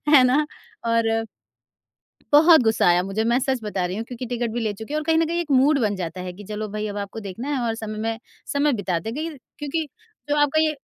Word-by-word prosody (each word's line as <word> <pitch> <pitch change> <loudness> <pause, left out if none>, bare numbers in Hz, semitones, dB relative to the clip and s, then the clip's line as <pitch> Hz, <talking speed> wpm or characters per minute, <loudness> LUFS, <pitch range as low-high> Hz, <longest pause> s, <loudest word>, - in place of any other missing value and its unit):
है 260 - +8
ना? 280 +4 +3 0.4
और 225 -1 +1 1.1
बहुत 315 +1 +8
गुस्सा 220 -4 +2
आया 175 +1 +4
मुझे। 195 +4 -2
मैं 235 +2 +3
सच 265 -1 0
बता 195 -4 -2
रही 185 +2 -4
हूँ 225 - -3
क्योंकि 245 +1 -6
टिकट 240 -1 -2
भी 240 - -2
ले 215 -2 0
चुकी 220 +7 -8
है - - +1
और 305 - -3
कहीं 325 0 +3
न 325 - +3
कहीं 340 +1 -1
एक 315 -4 -5
मूड 275 +2 +5
बन 205 -3 +1
जाता 180 0 -5
है 180 0 -5
कि 205 +3 -11
चलो 210 +1 -4
भाई 215 +1 -3
अब 205 - -6
आपको 200 +2 -5
देखना 205 +7 -6
है - - -1
और 225 - 0
समय 215 -1 -6
मैं 225 +1 -2 0.3
समय 285 0 +2
बिता 180 -3 0
ते। 220 - -5
देखिए 310 +2 -4 0.2
क्योंकि 305 +2 -2 0.4
जो 295 - +1
आपका 290 +1 +3
ये 310 -1 +1
230 Hz, 250 wpm, -23 LUFS, 210-290 Hz, 1.1 s, है